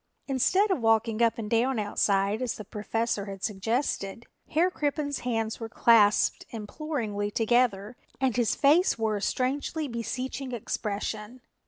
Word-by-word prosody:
Instead 370 - +2
of 325 - 0
walking 225 0 +2
up 230 -1 +3
and 225 -2 -4
down 235 +4 +1
outside 205 0 +1
as 250 -3 -1
the 215 - -8
Professor 215 0 -2
had 195 -1 -8
suggested, 225 0 -2 0.2
Herr 345 +4 +2
Crippen's 290 -2 -2
hands 225 -3 -2
were 225 -1 -5
clasped 215 -3 +4
imploringly 220 -3 -3
together 225 -1 +1 0.2
and 265 -3 +1
his 240 -3 +1
face 305 +4 +4
wore 220 -2 0
a - - -6
strangely 285 +6 -1
beseeching 255 +2 -4
expression. 215 +1 -4
230 Hz, 140 wpm, -27 LUFS, 210-260 Hz, 0.2 s, clasped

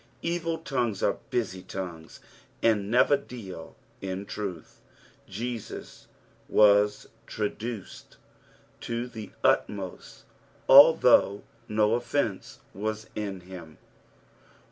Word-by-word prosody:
Evil 165 -1 -1
tongues 120 - -2
are - - +1
busy 95 -6 -2
tongues, 90 -3 -7 0.4
and 105 -3 +2
never 125 +5 +5
deal 105 -11 -9 0.3
in 95 +1 -4
truth. 95 -6 -7 0.5
Jeaus 115 +3 -6 0.4
was 105 0 +4 0.2
traduced 110 0 -5 0.6
to 115 +1 -3
the 110 -4 -9
utmost, 95 -3 -1 0.4
although 135 -8 +7 0.2
no 105 0 +2
offence 120 -3 -2
was 110 +2 -4
in 100 -3 -4
him. 90 -3 -11
105 Hz, 90 wpm, -27 LUFS, 95-120 Hz, 0.6 s, although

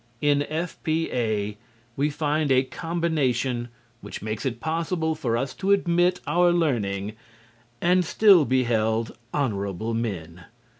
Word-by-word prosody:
In 145 -1 +3
F.P.A. 145 -10 -2 0.4
we 145 +2 +1
find 150 0 0
a 130 0 +5
combination 135 -7 -1 0.3
which 100 -1 -8
makes 110 +4 -3
it 120 -2 -4
possible 160 +2 -1
for 120 -7 -1
us 135 +2 -2
to 195 - -3
admit 180 -2 +2
our 175 0 +3
learning 110 - 0 0.7
and 180 +1 +3
still 190 0 +6
be 130 -1 +2
held 110 -1 0 0.2
honorable 110 -5 -2
men. 90 -7 -4
135 Hz, 120 wpm, -25 LUFS, 110-165 Hz, 0.7 s, still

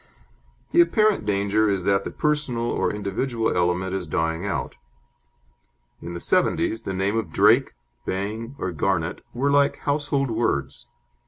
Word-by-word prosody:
The 345 - +6
apparent 215 - +2
danger 105 +1 +2
is 95 -2 0
that 100 +1 +2
the - - -2
personal 150 -6 -1
or - - 0
individual 110 +3 -2
element 90 +1 0
is 95 -3 -3
dying 80 +4 -1
out. 95 - -3 1.3
In 85 +1 -6
the - - -4
'seventies 110 - +1
the 95 - -4
name 95 +3 0
of 115 -2 -2
Drake, - - +4 0.3
Bang, 110 +7 -4
or 95 - -3
Garnet 85 0 -1
were 140 +4 0
like 140 0 +3
household 145 -2 0
words. 70 - -1
105 Hz, 145 wpm, -24 LUFS, 95-130 Hz, 1.3 s, The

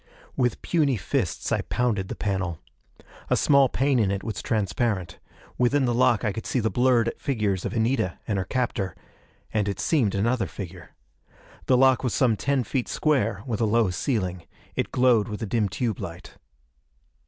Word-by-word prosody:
_ - - -35 0.3
With 125 -4 0
puny 145 -7 +2
fists 90 - -2
I - - +2
pounded 110 -6 -1
the - - -5
panel. 95 -5 -2 0.7
A - - +3
small 140 -2 +4
pane 135 0 +1
in 105 -4 +2
it 100 0 -2
was 110 - -4
transparent. 100 -3 -1 0.4
Within 130 +3 +3
the 120 - +1
lock 120 -1 +3
I 105 - +1
could 110 +3 -6
see 130 - 0
the 110 -1 0
blurred 120 -2 +3
figures 105 - -1
of - - -3
Anita 115 -4 0
and 105 -3 0
her - - 0
captor 115 -4 -2 0.6
and, 105 -2 +1
it 100 -2 -3
seemed, 125 - +1
another 115 +5 +1
figure. 90 -3 -9 0.7
The 130 - +5
lock 130 0 +4
was 125 - 0
some 120 -5 +3
ten 135 +3 0
feet 125 0 -2
square, 115 -10 0
with 120 -4 -2
a - - +4
low 110 -2 +2
ceiling. 90 - -2 0.3
It - - -2
glowed 125 -4 +3
with 105 +1 -5
a - - 0
dim 105 -1 0
tube 110 +1 -2
light. 85 +1 -8
115 Hz, 180 wpm, -25 LUFS, 100-125 Hz, 0.7 s, The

